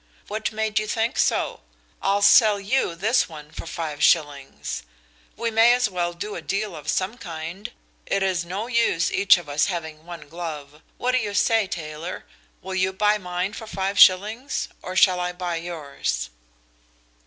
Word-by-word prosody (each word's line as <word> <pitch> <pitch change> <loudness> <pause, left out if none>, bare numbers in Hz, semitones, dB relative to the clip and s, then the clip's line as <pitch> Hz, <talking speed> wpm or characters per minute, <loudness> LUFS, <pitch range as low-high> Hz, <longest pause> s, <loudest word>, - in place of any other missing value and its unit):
"What 215 +1 -2
made 220 0 0
you 215 - -4
think 225 +2 -1
so? - - +1 0.4
I'll 200 +1 +1
sell 210 0 +6
you 200 -3 0
this 200 0 +2
one 150 -2 -11
for - - -8
five 155 -3 -5
shillings. 145 -4 +1 0.6
We 230 -1 -1
may 225 +2 +6
as 245 -2 +2
well 175 -1 -1
do 205 +5 -6
a - - -5
deal 200 -2 -2
of 150 -1 -7
some 195 +7 -1
kind; 170 +6 -7 0.4
it 195 0 +1
is 185 -2 0
no 190 +5 -4
use 235 -8 +1
each 200 0 +5
of 175 -3 -9
us 145 +1 +1
having 160 -3 -5
one 170 -4 -9
glove. 150 -2 -7 0.2
What 250 - 0
do 255 - +2
you 205 -3 -3
say, 225 -2 +3
Taylor? 160 0 -6 0.4
Will 190 - -5
you 185 0 +1
buy 210 +2 +2
mine 180 +1 -3
for 220 - -8
five 195 -1 -2
shillings, 215 +9 +4
or 185 - -6
shall 185 -1 +5
I 180 0 -2
buy 175 -1 -3
yours?" 145 - -4
185 Hz, 175 wpm, -24 LUFS, 165-210 Hz, 0.6 s, sell